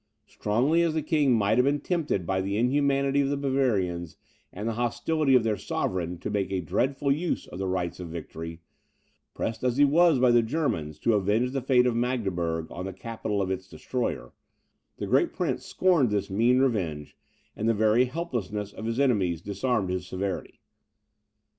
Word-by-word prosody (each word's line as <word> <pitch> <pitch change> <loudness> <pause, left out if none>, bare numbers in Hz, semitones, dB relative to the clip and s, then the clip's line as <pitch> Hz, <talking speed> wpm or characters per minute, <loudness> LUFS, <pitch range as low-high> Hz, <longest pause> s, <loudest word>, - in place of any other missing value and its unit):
Strongly 130 +11 +1
as 165 -2 +1
the 155 - 0
king 150 -3 +2
might 110 0 +3
have 125 - +4
been 145 +1 +2
tempted 155 - -1
by 95 +2 0
the 100 +2 -2
inhumanity 140 +3 +2
of 135 - 0
the 145 - 0
Bavarians, 105 - 0 0.3
and 105 +4 -5
the 115 - 0
hostility 130 +5 +1
of 125 - +5
their 110 -2 0
sovereign, 90 -2 -2
to - - -5
make 100 -2 -1
a 95 - 0
dreadful 135 - 0
use 160 +5 -1
of - - -9
the 95 - -2
rights 90 -2 -2
of 90 - -6
victory; 80 0 -7 0.7
pressed 115 +2 -3
as 125 0 +1
he 145 - +6
was 165 +1 +4
by 125 -1 +4
Germans 110 - -2
to 115 +9 +1
avenge 105 +5 +1
the 135 0 -2
fate 125 -1 +3
of 125 -2 +1
Magdeburg 95 -10 -1
on 90 +2 -5
the 95 - -5
capital 105 0 -3
of 95 - -2
its 95 0 -4
destroyer, 125 -2 -4 0.6
this - - -4
great - - +2
prince - - -2
scorned 175 -10 +3
this 100 -2 -1
mean 115 +6 +3
revenge; 95 - -1 0.4
and 110 +2 0
the - - +4
very 110 +4 +4
helplessness 115 - -4
of 110 - -7
his 115 +2 -2
enemies 100 - +2
disarmed 100 +1 -1
his 90 0 -3
severity. 95 +1 -4
115 Hz, 180 wpm, -27 LUFS, 95-135 Hz, 0.7 s, he